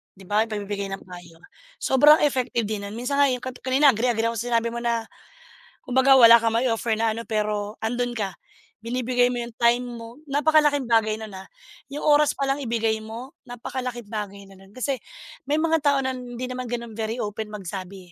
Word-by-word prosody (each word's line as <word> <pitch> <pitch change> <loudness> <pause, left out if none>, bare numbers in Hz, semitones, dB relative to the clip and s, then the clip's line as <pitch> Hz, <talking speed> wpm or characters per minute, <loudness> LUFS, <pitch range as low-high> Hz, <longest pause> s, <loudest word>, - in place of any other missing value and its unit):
'di 195 - -15
ba 210 +4 +1
pagbibigay 205 -2 -4
ng 195 - -7
payo. 175 -2 -13 0.4
Sobrang 295 +4 +6
effective 255 -5 +1
din 205 -1 -4
nun, 205 - -8
minsan 250 +4 -2
nga 285 - +6
yung 250 -2 -2
kanina 260 +2 +3
agreeng-agree 230 -1 0
ako 230 - -6
sa 240 - -4
sinabi 230 0 +1
mo 235 - -4
na, 235 -1 -1 0.8
kumbaga 260 0 +4
wala 230 0 +10
kang 225 0 0
ma-i-offer 230 -2 +1
na 225 -1 +2
ano 230 - -5
pero 210 -1 -2
andun 245 +2 -1
ka, 200 -5 -3 0.5
binibigay 245 +1 +1
mo 240 - -2
yung 235 -1 -8
time 240 +1 +3
mo. 235 +2 -9
Napakalaking 295 -1 +3
bagay 225 -2 +2
nun, 220 -1 -8
ah, 190 0 -9 0.4
yung 285 +2 -6
oras 295 -1 +4
pa - - -1
lang 270 +1 0
ibigay 225 -3 0
mo, 230 +5 -8 0.2
napakalaking 245 -1 -5
bagay 205 -2 -6
na 195 - -15
nun. 195 0 -18
Kasi 255 0 -2 0.5
may 295 - +3
mga 325 0 +2
tao 285 -1 +3
na 260 - 0
hindi 250 0 -6
naman 255 0 -5
gano'n 235 -1 -4
very 220 +1 -3
open 210 +1 -4
magsabi, 190 -2 -8
235 Hz, 190 wpm, -24 LUFS, 215-255 Hz, 0.8 s, wala